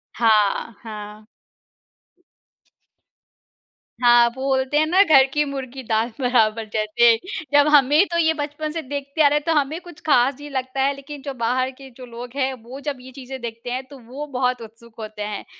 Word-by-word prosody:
हाँ, 220 -1 +2
हाँ। 210 -1 -9 2.8
हाँ, 240 -1 +6
वो 265 - -6
बोलते 265 +1 +1
हैं 310 - +4
ना 360 +5 +4
घर 290 -8 +6
की 300 - +2
मुर्गी 270 -2 -6
दाल 225 +1 0
बराबर 225 -3 +2
जैसे 225 +2 +4 0.4
जब 290 0 +6
हमें 295 +5 +6
तो 340 - 0
ये 320 -1 +3
बचपन 300 0 -4
से 325 +1 -4
देखते 280 +2 -4
आ - - +7
रहे 295 +1 +2
हैं, 295 - -3
तो 330 - +2
हमें 290 +4 -3
कुछ 345 -3 -13
ख़ास 265 -2 +3
नहीं 290 0 -9
लगता 260 0 -3
है 275 +1 +2
लेकिन 280 0 -10
जो 280 -1 -5
बाहर 255 +2 -1
के 270 0 -14
जो 255 - -9
लोग 240 +1 -9
हैं 265 -1 0
वो 250 +4 -9
जब 280 -2 -2
ये 260 +1 -12
चीज़ें 265 -1 -8
देखते 230 +1 -7
हैं 255 +1 -3
तो 275 -1 -13
वो 280 +4 -6
बहुत 250 -3 -1
उत्सुक 230 +1 -13
होते 215 -1 -7
हैं। 205 -1 -5
260 Hz, 190 wpm, -22 LUFS, 235-285 Hz, 2.8 s, आ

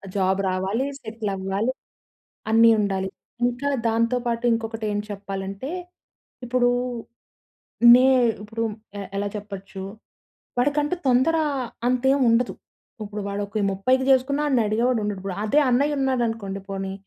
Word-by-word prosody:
Job 190 0 +1
రావాలి, 190 +8 -1
settle 220 -2 -5
అవ్వాలి, 195 +6 -1 0.8
అన్నీ 230 +1 +7
ఉండాలి. 190 -2 -1 0.4
ఇంకా 245 +4 -1 0.2
దాంతో 230 +2 +1
పాటు 235 0 -1
ఇంకొకటి 225 -1 -3
ఏం 205 - 0
చెప్పాలంటే, 195 +4 -5 0.8
ఇప్పుడు 245 0 +2 1.3
నే 255 +1 +5 0.4
ఇప్పుడు 225 +2 -4 0.4
ఎ - - -4 0.2
ఎలా 205 0 -1
చెప్పచ్చు, 195 -1 -8 0.8
వాడికంటూ 290 +5 +1
తొందర 260 +6 +3 0.5
అంతేముండదు. 250 -2 +3 0.5
ఇప్పుడు 210 0 -6
వాడు 200 +1 -3
ఒక 210 +1 -2
30కి 255 +7 +1
చేసుకున్నా 280 +3 +2
ఆడిని 255 -5 +3
అడిగేవాడుండడు. 215 -3 0
ఇప్పుడు 195 -2 -4
అదే 285 +8 +3
అన్నయ్యున్నాడు 265 -1 +1
అనుకోండి 200 -3 -4
పోనీ, 195 0 -4
225 Hz, 115 wpm, -24 LUFS, 200-255 Hz, 1.3 s, అన్నీ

